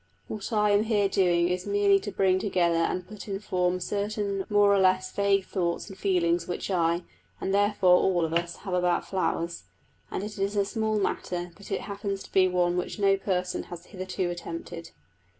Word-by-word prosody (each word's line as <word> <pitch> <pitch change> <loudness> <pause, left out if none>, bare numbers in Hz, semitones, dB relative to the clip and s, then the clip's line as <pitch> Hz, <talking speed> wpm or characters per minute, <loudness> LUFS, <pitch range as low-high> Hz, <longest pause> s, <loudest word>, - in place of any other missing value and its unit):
What 215 +2 -5
I 210 -1 +3
am 205 +2 +3
here 210 -3 +2
doing 175 -3 +2
is 180 +2 -2
merely 200 -1 +4
to 205 - -6
bring 185 -1 +2
together 180 -4 +1
and 180 +2 -1
put 210 +2 -10
in 195 -1 -3
form 180 -2 0
certain 200 0 -2
more 205 -1 +5
or 200 - +3
less 185 0 +2
vague 200 -1 +2
thoughts 175 0 -2
and - - -9
feelings 175 -3 +1
which 180 +2 -4
I 170 -1 +1 0.4
(and 195 - -2
therefore 200 -3 +4
all 175 -3 +2
of 160 - -4
us) 170 0 -1
have 190 - -3
about 180 -1 +1
flowers; 170 - -2 0.4
and - - -3
it 210 -1 -7
is 200 +1 -1
a 200 -1 +2
small 220 0 -1
matter, 180 -3 -2
but 200 - -13
it - - -1
happens 200 -1 -4
to - - -15
be 190 -1 +5
one 180 -1 +1
which 180 - -3
no 195 -1 +4
person 185 -2 -2
has 175 0 -8
hitherto 185 -1 -4
attempted. 170 0 -7
190 Hz, 195 wpm, -27 LUFS, 175-200 Hz, 0.4 s, more